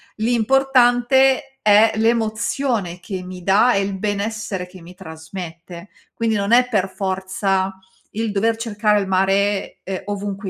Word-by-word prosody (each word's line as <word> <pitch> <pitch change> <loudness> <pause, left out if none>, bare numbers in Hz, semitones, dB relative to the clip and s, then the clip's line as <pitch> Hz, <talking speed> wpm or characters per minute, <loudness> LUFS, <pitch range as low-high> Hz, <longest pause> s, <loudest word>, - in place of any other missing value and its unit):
l'importante 265 +3 +2
è 210 +1 +5
l'emozione 225 -3 -1
che 185 +1 -6
mi 180 -1 -9
dà, 210 +6 +4
e 200 - +2
il 195 0 -3
benessere 205 -2 -3
che 180 0 -15
mi 180 +2 -13
trasmette. 170 +1 -9 0.2
Quindi, 225 -1 -1
non 200 +1 -1
è 250 +1 +5
per 200 -6 0
forza 190 0 -2 0.4
il 220 0 -2
dover 220 +3 +1
cercare 210 -2 0
il 195 - -4
mare, 195 +1 0
uhm, 190 0 -4
ovunque 200 -1 -4
205 Hz, 135 wpm, -20 LUFS, 190-230 Hz, 0.4 s, è